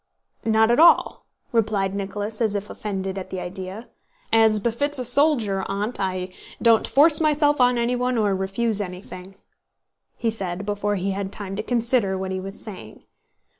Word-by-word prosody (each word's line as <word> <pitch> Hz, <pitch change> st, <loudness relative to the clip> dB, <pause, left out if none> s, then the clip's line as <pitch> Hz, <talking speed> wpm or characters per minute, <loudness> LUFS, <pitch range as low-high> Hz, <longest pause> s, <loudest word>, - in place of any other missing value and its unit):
"Not 220 Hz, 0 st, +3 dB
at 240 Hz, -, +2 dB
all," 340 Hz, +1 st, +4 dB, 0.2 s
replied 210 Hz, -4 st, 0 dB
Nicholas 205 Hz, +2 st, -4 dB
as 215 Hz, -3 st, +1 dB
if 205 Hz, +1 st, -4 dB
offended 195 Hz, -2 st, -4 dB
at 185 Hz, -, -8 dB
the 190 Hz, -, -5 dB
idea. 190 Hz, +5 st, -7 dB, 0.5 s
"As 220 Hz, -1 st, +5 dB
befits 260 Hz, +7 st, -1 dB
a 255 Hz, -, +1 dB
soldier, 240 Hz, -7 st, +3 dB
Aunt, 205 Hz, +3 st, -2 dB
I 185 Hz, -1 st, -2 dB, 0.3 s
don't 230 Hz, -2 st, +4 dB
force 300 Hz, +2 st, +5 dB
myself 295 Hz, -2 st, +2 dB
on 245 Hz, 0 st, +4 dB
anyone 245 Hz, +1 st, 0 dB
or 205 Hz, -3 st, +1 dB
refuse 200 Hz, +3 st, 0 dB
anything," 185 Hz, 0 st, -8 dB, 0.8 s
he 230 Hz, -1 st, -1 dB
said 195 Hz, -3 st, -4 dB
before 205 Hz, 0 st, -1 dB
he 195 Hz, +1 st, -2 dB
had 195 Hz, 0 st, -4 dB
time 195 Hz, -2 st, -5 dB
to 210 Hz, -, -2 dB
consider 230 Hz, -4 st, 0 dB
what 190 Hz, 0 st, -4 dB
he 190 Hz, -, -3 dB
was 195 Hz, +1 st, -8 dB
saying. 185 Hz, -, -10 dB
210 Hz, 165 wpm, -23 LUFS, 195-235 Hz, 0.8 s, As